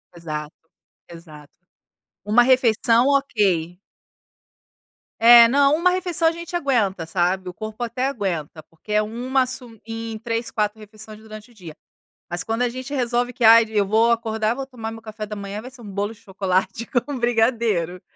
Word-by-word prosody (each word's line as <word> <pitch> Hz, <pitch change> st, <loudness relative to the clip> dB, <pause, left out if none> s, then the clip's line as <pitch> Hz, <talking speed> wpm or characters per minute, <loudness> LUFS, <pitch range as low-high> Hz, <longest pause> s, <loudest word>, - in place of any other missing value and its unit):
Exato, 155 Hz, -2 st, -6 dB, 0.6 s
exato. 155 Hz, -4 st, -14 dB, 0.7 s
1 220 Hz, +4 st, +4 dB
refeição, 240 Hz, -1 st, +3 dB
OK. 195 Hz, -, 0 dB, 1.4 s
É, 235 Hz, 0 st, +9 dB
não, 280 Hz, +3 st, +3 dB
1 355 Hz, +3 st, +2 dB
refeição 350 Hz, -3 st, +1 dB
a -, -, +4 dB
gente 340 Hz, +1 st, -8 dB
aguenta, 215 Hz, -, 0 dB
sabe. 180 Hz, +2 st, -1 dB
O -, -, -9 dB
corpo 215 Hz, +4 st, -7 dB
até 250 Hz, +3 st, -2 dB
aguenta, 175 Hz, -, -4 dB
porque 165 Hz, +7 st, -14 dB
é 210 Hz, -, +4 dB
1 250 Hz, +4 st, -1 dB
sum 245 Hz, -4 st, -7 dB
em 225 Hz, -1 st, -6 dB
3, 230 Hz, 0 st, -3 dB
4 210 Hz, 0 st, -2 dB
refeições 215 Hz, 0 st, -12 dB
durante 215 Hz, +1 st, -12 dB
o -, -, -21 dB
dia. 170 Hz, -7 st, -11 dB, 0.5 s
Mas, 175 Hz, +1 st, -1 dB
quando 225 Hz, +2 st, -3 dB
a 245 Hz, -, +1 dB
gente 255 Hz, +3 st, -7 dB
resolve 245 Hz, -1 st, 0 dB
que 245 Hz, -, -5 dB
"Ai, 225 Hz, 0 st, +8 dB
eu 205 Hz, -2 st, +1 dB
vou 225 Hz, +3 st, +3 dB
acordar, 220 Hz, -1 st, 0 dB
vou 270 Hz, 0 st, -5 dB
tomar 230 Hz, -4 st, -7 dB
meu 225 Hz, 0 st, -10 dB
café 215 Hz, -1 st, -7 dB
da 210 Hz, 0 st, -7 dB
manhã, 200 Hz, +1 st, -6 dB
vai 255 Hz, +2 st, -10 dB
ser 250 Hz, -2 st, -14 dB
um 210 Hz, -, -10 dB
bolo 205 Hz, +3 st, -3 dB
de -, -, -21 dB
chocolate 190 Hz, +2 st, -2 dB, 0.2 s
com 285 Hz, -2 st, -5 dB
brigadeiro. 225 Hz, -7 st, 0 dB
225 Hz, 170 wpm, -22 LUFS, 200-245 Hz, 1.4 s, É